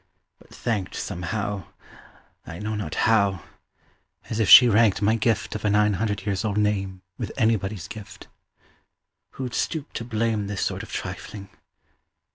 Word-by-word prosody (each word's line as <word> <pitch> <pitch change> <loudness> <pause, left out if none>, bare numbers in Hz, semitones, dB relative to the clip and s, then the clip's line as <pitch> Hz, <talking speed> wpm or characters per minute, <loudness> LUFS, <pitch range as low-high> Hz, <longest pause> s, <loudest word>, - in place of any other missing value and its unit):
but - - -21
thanked 105 -6 -3
Somehow 100 0 -3 0.8
I 80 - -8
know 105 +3 -4
not 100 -8 -4
how 100 -6 +2 0.9
as 110 - -2
if 105 -4 +2
she 125 - +11
ranked 110 -3 +4
My 105 +2 +2
gift 115 -1 0
of 105 - -5
a 105 - +2
nine 105 0 +3
hundred 105 -1 -2
years 100 -3 -1
old 105 -2 -1
name 100 -3 -1 0.2
With - - -4
anybody's 110 -6 0
gift. 110 -3 -10 1.1
Who'd 125 -2 -5
stoop 155 -3 -2
to - - -4
blame 110 -3 -1
This 100 -1 -3
sort - - -2
of - - -10
trifling? 100 -2 -6
105 Hz, 150 wpm, -24 LUFS, 100-110 Hz, 1.1 s, she